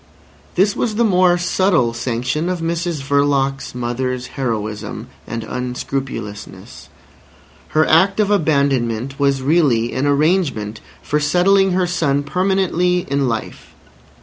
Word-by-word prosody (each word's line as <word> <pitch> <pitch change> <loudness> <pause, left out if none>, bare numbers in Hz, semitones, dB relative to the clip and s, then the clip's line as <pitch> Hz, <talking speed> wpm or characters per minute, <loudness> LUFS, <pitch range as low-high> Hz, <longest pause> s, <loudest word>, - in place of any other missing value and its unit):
This 200 +3 +2
was 220 -3 -1
the 235 - +2
more 185 -4 +4
subtle 175 -8 +1
sanction 125 +7 -2
of 180 -1 -2
Mrs 165 -2 -2
Verloc's 140 -1 0
mother's 125 +1 -3
heroism 110 -5 -4 0.2
and 115 -1 -4
unscrupulousness. 125 -3 -6 0.8
Her 155 0 +2
act 190 +6 +4
of 210 -1 +2
abandonment 140 - 0
was 140 -2 +1
really 135 -7 +2
an 135 +3 0
arrangement 145 - 0 0.2
for 150 - 0
settling 180 +5 +3
her 185 0 +2
son 145 -5 0
permanently 180 +1 0
in 140 -1 +1
life. 115 -1 -6
145 Hz, 120 wpm, -19 LUFS, 125-180 Hz, 0.8 s, more